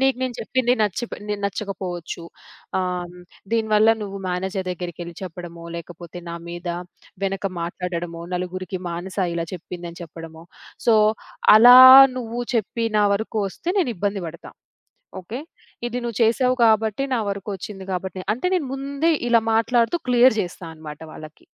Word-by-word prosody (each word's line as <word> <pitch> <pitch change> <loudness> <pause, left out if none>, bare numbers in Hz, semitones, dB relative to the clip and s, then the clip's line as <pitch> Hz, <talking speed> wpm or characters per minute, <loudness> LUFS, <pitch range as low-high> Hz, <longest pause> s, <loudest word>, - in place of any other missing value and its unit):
"నీకు 270 -1 +3
నేను 255 -2 -2
చెప్పింది 250 +2 +1
నచ్చి 210 +4 -1
ప - - -6
నేను 205 -1 -2
నచ్చకపోవచ్చు. 185 -4 -5 0.6
ఆహ్, 180 -1 -2
హ్మ్, 180 0 -14 0.3
దీని 220 -1 0
వల్ల 215 +2 +6
నువ్వు 200 -1 -6
మేనేజర్ 190 +1 -2
దెగ్గిరకెళ్ళి 175 -1 -6
చెప్పడమో, 170 -1 -8
లేకపోతే 175 +1 -10
నా 170 - -5
మీద 175 +1 -6 0.6
వెనక 195 0 -2 0.2
మాట్లాడడమో, 170 -1 -4
నలుగురికి 185 0 -5
మానస 180 +4 -6 0.2
ఇలా 165 0 -2
చెప్పింది 175 0 -8
అని 170 - -13
చెప్పడమో, 165 0 -11 0.4
సో, 230 - +6 0.6
అలా 245 +3 +10 0.4
నువ్వు 240 0 -4
చెప్పి 230 +2 -1
నా 205 - +4
వరుకు 220 +1 -3
ఒస్తే, 335 - -8
నేనిబ్బంది 205 - -2
బడతా. 170 +1 -11 0.7
ఓకే, 220 +8 -7 0.5
ఇది 240 +1 -3
నువ్వు 235 -3 -4
చేశావు 250 +3 +3
కాబట్టి, 220 +2 +2
నా - - +1
వరుకు 200 +1 -4
ఒచ్చింది 195 0 -8
గాబట్టి," 185 +1 -4
నె - - -8
అంటే, 255 +10 -3
నేను 300 -8 -1
ముందే 280 +4 0 0.2
ఇలా 230 -2 +4
మాట్లాడుతూ 230 +6 +2
క్లియర్ 245 -1 +5
జేస్తా 180 -1 -6
అనమాట 150 -1 -10
వాళ్ళకి. 155 0 -12
195 Hz, 150 wpm, -22 LUFS, 175-230 Hz, 0.7 s, అలా